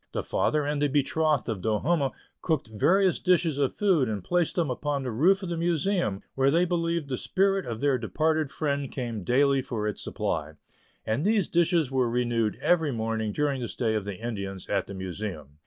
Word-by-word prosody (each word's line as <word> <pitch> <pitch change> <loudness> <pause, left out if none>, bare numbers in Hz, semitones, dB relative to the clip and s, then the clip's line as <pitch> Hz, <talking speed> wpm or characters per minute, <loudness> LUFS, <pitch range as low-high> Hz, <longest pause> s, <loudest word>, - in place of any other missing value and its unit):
The - - -2
father 150 -1 0
and 145 0 -1
the 145 - +3
betrothed 150 +1 +1
of 110 -5 -3
Do 110 +2 +1
humme 145 +1 +1 0.3
cooked 155 -9 -1
various 185 - +3
dishes 170 -5 +2
of 140 -2 0
food 175 - +2
and 105 -4 -3
placed 175 - 0
them 165 -7 0
upon 140 +1 -2
the 125 - -3
roof 185 - +3
of 185 - -4
the 170 - -2
Museum, 170 - 0
where 135 0 +3
they 170 +5 +3
believed 170 -3 -1
the 130 -3 -3
spirit 195 -2 +1
of 115 -2 -5
their 140 -3 +2
departed 155 +5 0
friend 140 -2 -2
came 115 -6 -4
daily 135 +4 +3
for 115 -5 -3
its 105 - -3
supply; - - -3 0.5
and 110 +7 0
these 210 -1 +2
dishes 170 -4 +2
were 130 -3 +1
renewed 120 -3 0
every 160 -4 +3
morning 110 -2 -2
during 140 +1 -1
the 120 - -2
stay 115 -2 -1
of 105 -2 -1
the 100 -1 -4
Indians 100 -5 -5
at 100 -2 -1
the 100 - -7
Museum. 90 -6 -6
140 Hz, 200 wpm, -27 LUFS, 110-165 Hz, 0.5 s, the